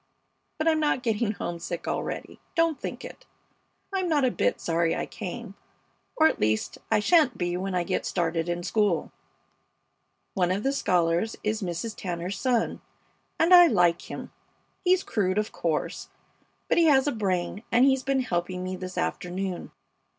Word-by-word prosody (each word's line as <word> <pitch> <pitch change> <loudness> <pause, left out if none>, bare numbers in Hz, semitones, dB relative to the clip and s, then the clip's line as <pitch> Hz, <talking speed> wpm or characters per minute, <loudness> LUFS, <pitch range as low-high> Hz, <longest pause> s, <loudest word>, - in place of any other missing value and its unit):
But 310 - -1
I'm 320 -1 +4
not 295 -4 +1
getting 220 -2 0
homesick 175 -2 -5
already; - - -4 0.2
don't 330 -3 +2
think - - -5
it. - - -11 0.7
I'm 375 -2 0
not 295 -4 +3
a 250 - +2
bit - - 0
sorry 165 0 +1
I - - -2
came, 215 +1 -7 0.6
or 315 - +4
at - - +3
least 110 0 0
I 220 - +3
sha'n't 295 +1 +4
be 175 -1 -1
when 190 +1 -3
I 180 - +1
get 185 +1 -2
started 165 0 -1
in 175 0 -2
school. 200 -6 +1 1.2
One 180 -2 +1
of 195 +3 -1
the 275 - +1
scholars 175 -2 +1
is 215 +1 -1
Mrs. 185 +4 -3
Tanner's 180 +1 -4
son, 245 -3 0 0.6
and 335 +3 +5
I 350 -1 +10
like 175 - +2
him. - - -7 0.5
He's 370 0 +3
crude, 190 -3 0
of 210 0 0
course, 160 -3 -2 0.6
but - - +3
he 335 - +5
has 275 -3 +5
a 290 - +1
brain, 195 -3 -1
and 245 +2 +5
he's 265 -1 +3
been 270 0 +1
helping 180 -4 -2
me 185 0 -3
this 185 0 -7
afternoon. 180 +1 -3
200 Hz, 165 wpm, -27 LUFS, 175-265 Hz, 1.2 s, I